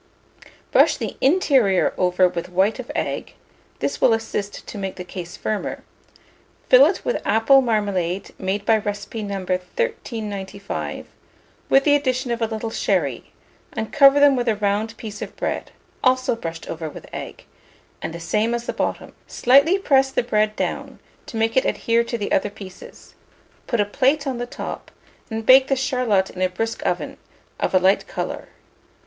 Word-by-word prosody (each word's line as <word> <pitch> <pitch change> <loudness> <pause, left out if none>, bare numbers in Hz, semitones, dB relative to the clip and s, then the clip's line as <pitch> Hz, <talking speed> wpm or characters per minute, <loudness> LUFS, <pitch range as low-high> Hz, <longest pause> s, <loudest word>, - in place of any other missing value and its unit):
Brush - - +5
the - - -4
interior 265 - +3
over 180 0 +3
with 175 -1 -5
white 190 +7 +1
of 250 - -6
egg - - -3 0.5
(this - - -2
will 235 - +5
assist 210 -2 -5
to - - -8
make 195 -1 -4
the 180 - -6
case 175 -1 -8
firmer); 215 -1 -3 0.9
fill - - +8
it - - -3
with - - -1
apple 225 +6 +5
marmalade 200 -6 -1
made 195 +2 -2
by 220 0 +4
recipe 205 +2 -5
No. 200 -1 -4
1395, 200 - -4 0.6
with 270 - +5
the 290 - +4
addition 255 -3 0
of 235 0 -2
a 225 - +2
little 220 0 -4
sherry, 155 - -1 0.4
and 220 0 -4
cover 280 0 +7
them 285 -1 +6
with 245 -1 -1
a 220 - +3
round 210 +2 -1
piece 210 -2 -8
of - - -6
bread, - - -3 0.3
also 255 -2 +2
brushed 165 -6 -7
over 160 -1 -5
with - - -11
egg, - - -7 0.6
the 165 +1 -5
same 215 +7 0
as 235 0 -4
the - - -3
bottom; - - -3
slightly 280 +9 +4
press 270 -8 +3
the 265 - 0
bread 215 -2 +1
down, - - -3 0.3
to 225 - -6
make 225 0 +1
it 260 - +4
adhere 230 0 +1
to 235 0 -3
the 205 - -4
other 205 - +2
pieces; 195 -3 -12 0.5
put 235 - 0
a 205 - +3
plate 275 +7 +1
on 260 -3 -3
the 245 - -3
top, - - -7 0.4
and 220 -1 -4
bake 260 +2 +7
the 270 - +2
charlotte 250 -7 +1
in 185 - -7
a 185 - +2
brisk 225 +5 -3
oven, - - -2 0.4
of - - 0
a - - +7
light 190 - +2
colour. - - -5
220 Hz, 170 wpm, -22 LUFS, 195-255 Hz, 0.9 s, fill